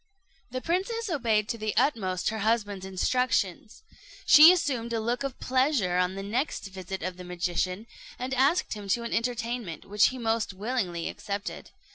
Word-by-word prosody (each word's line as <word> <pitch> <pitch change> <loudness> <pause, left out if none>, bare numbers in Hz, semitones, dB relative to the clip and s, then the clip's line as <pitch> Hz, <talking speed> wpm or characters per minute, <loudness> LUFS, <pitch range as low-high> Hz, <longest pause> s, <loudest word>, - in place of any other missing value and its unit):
The 255 +1 -4
princess 390 - -1
obeyed 225 -8 +1
to 230 - -3
the 215 0 -2
utmost 190 -10 +1
her 220 - -4
husband's 205 -3 0
instructions. 215 - -1 0.4
She 310 +3 +10
assumed 260 -10 -1
a 225 - 0
look 235 +2 -1
of 275 -2 -4
pleasure 255 -9 +1
on 180 +1 0
the 195 - -5
next 240 +8 -2
visit 190 -1 -6
of 185 0 -4
the 180 - -8
magician, 180 +3 -2 0.3
and 255 +2 -4
asked 275 +7 +2
him 205 -2 -8
to 235 +5 +1
an 235 - -4
entertainment, 235 -7 -2
which 205 +1 +4
he 260 - -4
most 225 -3 -1
willingly 195 -6 -2
accepted. 200 +1 -5
225 Hz, 165 wpm, -27 LUFS, 190-255 Hz, 0.4 s, She